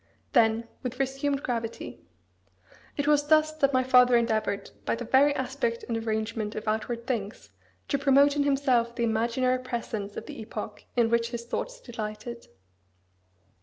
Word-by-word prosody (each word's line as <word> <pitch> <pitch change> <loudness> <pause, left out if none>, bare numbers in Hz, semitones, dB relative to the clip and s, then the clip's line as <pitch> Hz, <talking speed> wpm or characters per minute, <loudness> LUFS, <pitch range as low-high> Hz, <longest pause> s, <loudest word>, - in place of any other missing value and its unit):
Then, 230 -2 +3
with 250 0 -5
resumed 275 +1 -1
gravity 230 - -4 1.0
"It 285 - 0
was 290 -1 +3
thus 310 0 +4
that 275 -2 +3
my 255 -1 +3
father 250 -1 +6
endeavoured, 220 -3 -1
by - - 0
the 240 +1 -6
very 270 +5 +5
aspect 255 -3 -2
and 235 - -1
arrangement 220 -1 -2
of 215 - -6
outward 230 +2 -2
things, 205 - -4 0.4
to 280 - +1
promote 280 +1 +5
in 290 - +2
himself 265 -4 +2
the 235 - -1
imaginary 235 +3 +1
presence 230 -5 -5
of - - -5
the - - -8
epoch 215 -1 -7
in 235 -2 +3
which 235 0 +2
his 235 -1 -5
thoughts - - -4
delighted. 235 - -7
235 Hz, 155 wpm, -27 LUFS, 225-270 Hz, 1.0 s, father